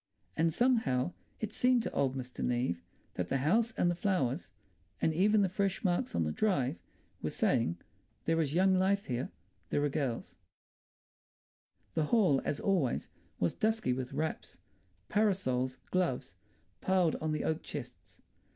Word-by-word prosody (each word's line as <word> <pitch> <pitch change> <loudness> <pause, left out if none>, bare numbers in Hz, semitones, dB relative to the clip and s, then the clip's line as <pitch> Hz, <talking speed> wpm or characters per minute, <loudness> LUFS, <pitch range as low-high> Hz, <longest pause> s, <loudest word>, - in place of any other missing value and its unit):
And 165 +1 +2
somehow, 180 - +2 0.3
it 220 -1 -4
seemed 250 -2 +3
to - - -3
old 135 -1 +1
Mr. 130 -1 -5
Neave 120 -8 0 0.3
that 90 -1 -3
the 135 - +2
house 220 - +2
and 175 - +2
the - - +1
flowers, 175 -6 0 0.5
and 160 - +2
even 205 +5 +4
the - - +3
fresh 195 +1 -1
marks 175 - 0
on 85 - +2
the 75 - -1
drive, 140 - +1 0.4
were - - -1
saying, 85 +2 +1 0.5
"There 165 0 +2
is 145 -3 0
young 190 +2 +5
life 195 +2 +2
here. 125 0 -2 0.4
There 145 - +1
are 145 - +2
girls—" 135 -5 -3 1.6
The 160 -2 +1
hall, 175 - +4
as 145 - -1
always, 180 -11 +1 0.3
was 85 - +1
dusky 220 - +1
with 125 0 -4
wraps, 155 +1 -3 0.5
parasols, 130 - +1
gloves, 180 -9 0 0.5
piled 185 -4 +3
on 155 0 -2
the 155 - -1
oak 160 0 0
chests. 120 - -9
160 Hz, 150 wpm, -32 LUFS, 130-195 Hz, 1.6 s, young